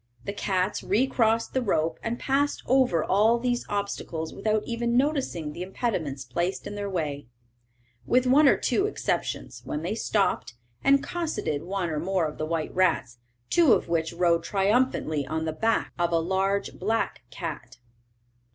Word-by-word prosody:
The 200 - -3
cats 190 -1 -1
re 220 +7 +2
crossed 230 -3 +1
the 260 - +1
rope, 165 -7 0
and 230 +1 -2
passed 280 +3 0
over 250 -11 +3
all 215 +5 +3
these 245 0 -1
obstacles 200 -5 -3
without 215 +1 0
even 235 0 0
noticing 260 - 0
the 175 - -7
impediments 180 - -3
placed 170 +9 -2
in - - -5
their 205 -1 -4
way, 145 -8 -3 0.8
with 255 +1 +3
one 280 +4 +6
or - - +5
two 395 - +1
exceptions, 420 - -3
when 150 +1 -4
they 175 - -1
stopped, 200 - 0 0.3
and 275 0 +4
cosseted 315 - -2
one 180 -1 -2
or 155 - -1
more 180 +1 0
of 150 - -5
the 155 - -2
white 160 -1 -2
rats, 160 -10 +1 0.3
two 330 -8 +6
of - - 0
which 165 -1 0
rode 170 -1 +2
triumphantly 195 - +1
on 160 +2 -2
the 160 - -2
back 225 +8 0
of 175 0 +1
a 165 - +3
large 190 +4 0
black 220 +4 -1
cat. - - -6
195 Hz, 165 wpm, -26 LUFS, 165-235 Hz, 0.8 s, one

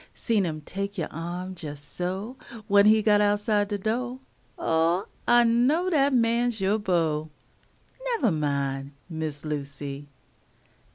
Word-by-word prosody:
Seen 215 -6 +1
him 155 -1 -4
tek 200 +6 -5
you' 170 - -1
arm 175 +3 -5
jes' 145 -3 -5
so, 185 - -4 0.3
When 200 0 +6
he 215 0 +5
got 210 -1 +4
outside 205 0 +2
de 205 0 -2
do' 245 +5 -2 0.4
Oh, 165 +3 +1 0.2
I 240 0 +6
know 260 +11 +2
dat 285 -3 +3
man's 235 -1 +2
yo' 195 +3 +1
beau! 160 -6 0 0.7
Nevah 465 - +1
min', 140 -2 -1
Miss 160 -3 -5
Lucy. 140 -1 -5
195 Hz, 130 wpm, -26 LUFS, 155-230 Hz, 0.7 s, When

